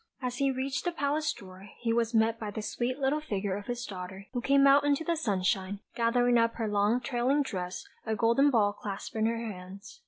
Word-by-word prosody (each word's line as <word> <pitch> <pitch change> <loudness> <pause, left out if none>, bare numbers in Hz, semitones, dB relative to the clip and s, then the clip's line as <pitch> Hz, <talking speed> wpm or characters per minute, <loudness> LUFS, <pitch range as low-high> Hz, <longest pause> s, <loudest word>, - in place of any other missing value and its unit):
As 250 -2 -3
he 275 +1 +2
reached 265 +1 -2
the 350 - 0
palace 300 -1 0
door, 190 -4 -11
he 230 -1 0
was 230 -1 +1
met 225 0 +2
by 215 - -4
the 210 +1 -5
sweet 245 +4 -2
little 280 +2 +1
figure 200 -8 -2
of 205 0 -7
his 240 0 -3
daughter, 190 0 -7
who 245 - -1
came 275 +2 +4
out 280 +1 +6
into 290 +2 +2
the 340 0 0
sunshine, 195 - 0
gathering 240 +1 +3
up 230 0 +2
her 225 -2 -2
long 210 +4 +2
trailing 260 +3 +1
dress, 185 -7 -5 0.2
a 220 -1 -1
golden 235 +6 +4
ball 210 -6 +3
clasped 200 0 -6
in 220 0 +2
her 230 0 0
hands. 195 +3 -9
230 Hz, 215 wpm, -29 LUFS, 205-270 Hz, 0.2 s, out